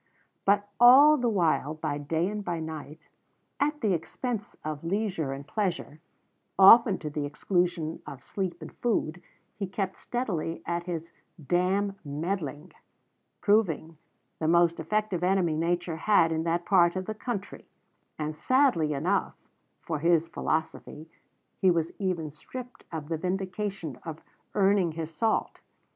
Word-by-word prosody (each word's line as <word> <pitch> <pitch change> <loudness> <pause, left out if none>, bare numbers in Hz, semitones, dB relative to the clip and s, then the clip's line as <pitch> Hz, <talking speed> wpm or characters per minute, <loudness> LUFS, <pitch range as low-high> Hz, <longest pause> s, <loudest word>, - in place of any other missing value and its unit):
But 200 +1 +3
all 270 +5 +9
the 245 -4 +1
while, 165 -6 +1
by 155 -2 -3
day 160 +4 -1
and 210 +1 -4
by 175 -3 -2
night, 160 0 -8 0.5
at 295 +1 0
the 210 -4 +2
expense 215 +6 -4
of 155 -1 -4
leisure 185 -5 -1
and 135 +1 -6
pleasure, 180 -7 -2 0.6
often 200 +1 +8
to 155 - -5
the 150 0 -2
exclusion 165 +2 -1
of 130 -2 -9
sleep 190 -3 -4
and - - -10
food, 180 -8 -1 0.4
he 195 - -2
kept 190 0 -3
steadily 170 -9 -3
at 170 0 -2
his 170 -2 -5 0.4
"damn 195 +3 +1
meddling," 155 +1 -4 0.7
proving 165 -7 +1 0.4
the 155 - -1
most 170 0 +4
effective 195 +1 -1
enemy 180 -3 +2
nature 170 +1 -1
had 165 -3 +3
in 160 0 -1
that 170 +1 0
part 175 -3 +4
of 185 0 -3
the 215 - -3
country; 215 -2 -6 0.5
and 155 0 -3
sadly 250 - +2
enough 180 +8 0 0.5
for 160 -3 -3
his 165 +1 +3
philosophy 160 0 -3 0.5
he 190 - +4
was 165 -2 +1
even 175 -6 -2
stripped 245 - -10
of 155 -3 -5
the 165 0 -2
vindication 185 - -3
of 160 -2 -7 0.3
earning 195 -4 +3
his 165 0 -5
salt. 220 +7 0
175 Hz, 140 wpm, -28 LUFS, 160-200 Hz, 0.7 s, all